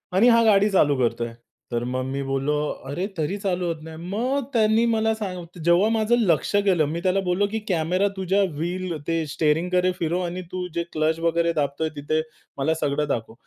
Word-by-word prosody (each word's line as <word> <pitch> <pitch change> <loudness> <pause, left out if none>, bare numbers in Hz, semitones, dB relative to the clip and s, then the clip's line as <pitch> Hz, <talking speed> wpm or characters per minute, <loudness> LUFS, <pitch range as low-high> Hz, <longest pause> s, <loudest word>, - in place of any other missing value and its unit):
आणि 200 +6 +5
हा 230 -1 +5
गाडी 205 -2 +5
चालू 150 -8 +3
करतोय. 120 -1 -1 0.4
तर 120 0 -1
मग 130 +1 -2
मी 135 +1 -3
बोललो 135 +2 0 0.3
अरे 160 +7 -2
तरी 160 +6 -1
चालू 185 -3 -1
होत 165 -2 -3
नाही? 160 0 -9
मग 230 +11 -1
त्यांनी 220 0 +3
मला 220 -1 +2
सा 215 -2 -3 0.4
जेव्हा 175 +5 +4
माझं 225 +1 +2
लक्ष 180 -3 +1
गेलं 175 -6 +3
मी 155 +4 -3
त्याला 185 +1 +2
बोललो 180 +3 +2
की 220 - -1
कॅमेरा 180 +2 +1
तुझ्या 190 +1 +1
व्हील 175 +2 -3
ते 165 -1 0
स्टिअरिंगकडे 175 +5 +1
फिरव 170 +2 0
आणि 175 +1 -4
तू 185 0 -3
जे 170 0 -1
क्लच 160 +1 +1
वगैरे 170 0 +1
दाबतोय, 150 +1 -1
तिथे 150 +2 -1 0.4
मला 140 +3 +1
सगळं 145 +1 0
दाखव. 115 -5 -3
170 Hz, 185 wpm, -24 LUFS, 155-195 Hz, 0.4 s, आणि